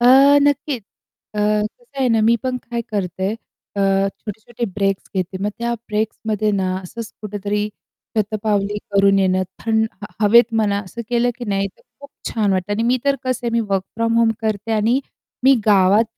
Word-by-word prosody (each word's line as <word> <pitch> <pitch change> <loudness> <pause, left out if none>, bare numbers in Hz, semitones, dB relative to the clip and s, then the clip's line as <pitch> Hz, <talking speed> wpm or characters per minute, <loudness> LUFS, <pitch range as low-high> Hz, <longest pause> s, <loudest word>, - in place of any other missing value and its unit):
अ, - - +1 0.4
नक्कीच 285 -3 0 0.5
अ, - - -4
कसं 210 - -1
आहे 260 - +3
ना, 225 -2 +3
मी 225 +2 +5
पण 255 -1 -1
काय 235 -1 -4
करते 190 -2 -2 0.5
अ, 195 0 +2
छोटे 210 +1 -8
छोटे 240 +2 -5
ब्रेक्स 195 -1 0
घेते 185 0 -2
मग 205 - 0
त्या 235 0 -1
ब्रेक्समध्ये 215 -1 -1
ना, 190 -2 0
असंच 220 +5 -8
कुठेतरी 205 0 -2 0.5
शतपावली 210 -1 0
करून 195 0 +4
येणं 185 -1 +2 0.2
थं 220 -1 +2 0.4
हवेत 230 +3 +6
म्हणा 210 -2 +2
असं 185 +5 -8
केलं 245 0 +2
की 245 - -5
नाही 195 0 +1
तर - - -25 0.2
खूप 285 0 -12 0.2
छान 210 -3 +1
वाटतं 185 +2 -1
आणि 210 +2 0
मी 245 +2 +2
तर 280 0 +3
कसं 255 -1 0
आहे - - +1
मी 235 - +2
वर्क 195 -1 +2
फ्रॉम 230 0 +1
होम 230 -1 +4
करते 220 0 -2
आणि 220 +5 +2 0.4
मी 270 +1 +7
गावात 200 +1 +5
215 Hz, 180 wpm, -20 LUFS, 200-235 Hz, 0.5 s, मी